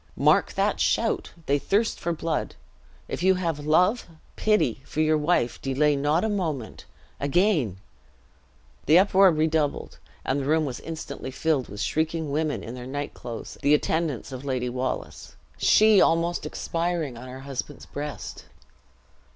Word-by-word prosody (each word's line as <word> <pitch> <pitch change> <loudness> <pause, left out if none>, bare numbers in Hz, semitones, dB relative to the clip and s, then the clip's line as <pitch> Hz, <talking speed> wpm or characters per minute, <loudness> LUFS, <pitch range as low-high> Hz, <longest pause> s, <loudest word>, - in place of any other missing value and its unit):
Mark - - +3
that - - 0
shout! - - +1
they 145 +1 +2
thirst 210 +9 0
for 170 - -2
blood. 165 -1 -2 0.5
If - - -4
you 190 +1 +4
have 165 -5 -2
love, 180 +9 +3 0.3
pity, 210 - +1
for 150 - -6
your 155 0 +3
wife, 150 -5 +1
delay 145 +2 +2
not 145 +5 +1
a - - +1
moment. 160 - -3 0.3
Again 145 - +1 0.6
" - - -33
The 155 +4 +7
uproar 195 0 +6
redoubled, 155 -1 0 0.3
and 135 +2 0
the 135 - -3
room 155 +2 +2
was 130 -3 -4
instantly 160 -4 -6
filled 140 0 0
with 100 +1 -6
shrieking 160 +5 -1
women 155 +1 -1
in 115 - -7
their 125 0 -8
night 145 +2 -4
clothes, 115 -2 -8
the 145 +2 +5
attendants 150 -5 -1
of 130 0 -7
Lady 130 -3 -1
Wallace. 125 +1 -4 0.2
She 215 -2 +6
almost 170 +1 +2
expiring, 165 -5 -2
on 120 +2 -9
her 130 +1 -9
husband's 140 +1 -6
breast. 145 0 -7
150 Hz, 150 wpm, -25 LUFS, 135-170 Hz, 0.6 s, The